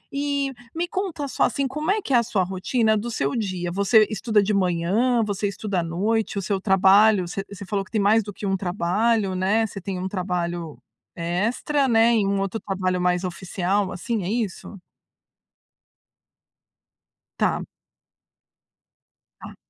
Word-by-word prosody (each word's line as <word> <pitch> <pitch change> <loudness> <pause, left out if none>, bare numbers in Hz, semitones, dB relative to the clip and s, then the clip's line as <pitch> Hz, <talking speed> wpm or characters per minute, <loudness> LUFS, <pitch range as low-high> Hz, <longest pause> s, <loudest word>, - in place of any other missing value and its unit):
E 280 -1 -1 0.2
me 345 +1 -1
conta 355 -7 -3
só, - - -6
assim: 275 -1 +1
Como 305 +6 -4
é 430 - +1
que 280 - -3
é 245 - +7
a - - +5
sua 210 -5 0
rotina 215 +5 +1
do 230 +3 -3
seu 140 -9 -1
dia? 185 -5 -2
Você 200 +3 +4
estuda 215 0 +2
de 210 +1 0
manhã, 195 +7 +1
você 205 0 -1
estuda 200 -1 -2
à - - -3
noite? 205 +6 -1
O - - -3
seu 195 -1 -1
trabalho 195 0 +5
Você 195 +3 -4
você 200 0 -8
falou 200 0 -1
que - - -20
tem 220 -2 +1
mais 225 +1 +5
do 205 - -7
que 205 - -7
um 195 - +1
trabalho, 195 +3 0
né? 200 +5 +2
Você 195 -2 -8
tem 190 0 -4
um 185 - -3
trabalho 175 -4 -3 0.4
extra, 220 - 0
né? 230 0 +4
E 210 - +2
um 200 0 0
outro 195 +3 -2
trabalho 185 -2 -1
mais 180 0 +1
oficial 185 +2 -1
assim, 220 +2 -3
é 175 - -3
isso? 215 -3 -3 2.6
Tá. - - +1 1.8
Tá. - - -10
200 Hz, 165 wpm, -23 LUFS, 185-225 Hz, 2.6 s, é